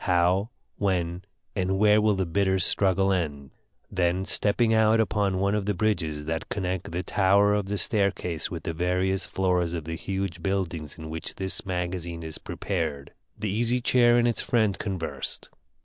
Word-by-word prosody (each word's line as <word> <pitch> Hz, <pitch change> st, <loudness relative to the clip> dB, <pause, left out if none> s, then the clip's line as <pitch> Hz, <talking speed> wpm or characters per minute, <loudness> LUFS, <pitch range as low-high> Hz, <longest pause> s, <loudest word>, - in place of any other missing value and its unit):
How, 90 Hz, +3 st, +2 dB, 0.3 s
when, 90 Hz, -2 st, -1 dB, 0.3 s
and 95 Hz, +1 st, 0 dB
where 105 Hz, +1 st, +5 dB
will 105 Hz, -1 st, +3 dB
the 95 Hz, -1 st, 0 dB
bitter 95 Hz, +3 st, +1 dB
struggle 95 Hz, +1 st, +2 dB
end?" 75 Hz, -6 st, -3 dB, 0.4 s
Then 95 Hz, 0 st, +1 dB
stepping 110 Hz, +3 st, +2 dB
out 110 Hz, 0 st, +4 dB
upon 105 Hz, -3 st, +1 dB
one 100 Hz, +1 st, +1 dB
of 105 Hz, -1 st, -1 dB
the 105 Hz, -, +1 dB
bridges 80 Hz, -7 st, -1 dB
that 80 Hz, +1 st, -3 dB
connect 95 Hz, -2 st, -3 dB
the 90 Hz, +2 st, -2 dB
tower 100 Hz, +2 st, +3 dB
of 105 Hz, -2 st, 0 dB
the 105 Hz, +1 st, -2 dB
staircase 95 Hz, -7 st, 0 dB
with 85 Hz, -3 st, -6 dB
the 80 Hz, -, -3 dB
various 90 Hz, +3 st, 0 dB
floors 90 Hz, -3 st, 0 dB
of 85 Hz, -2 st, -3 dB
the 80 Hz, -, -4 dB
huge 95 Hz, 0 st, -3 dB
buildings 85 Hz, -5 st, -2 dB
in 80 Hz, -1 st, -8 dB
which 80 Hz, +1 st, -5 dB
this 95 Hz, +1 st, -3 dB
MAGAZINE 90 Hz, -2 st, -3 dB
is 80 Hz, -1 st, -5 dB
prepared, 70 Hz, -1 st, -3 dB, 0.2 s
the 105 Hz, -2 st, -2 dB
Easy 120 Hz, +4 st, +1 dB
Chair 120 Hz, -1 st, +4 dB
and 120 Hz, 0 st, +3 dB
its 120 Hz, -, 0 dB
friend 110 Hz, -5 st, +2 dB
conversed. 95 Hz, -5 st, -3 dB
95 Hz, 170 wpm, -26 LUFS, 85-105 Hz, 0.4 s, where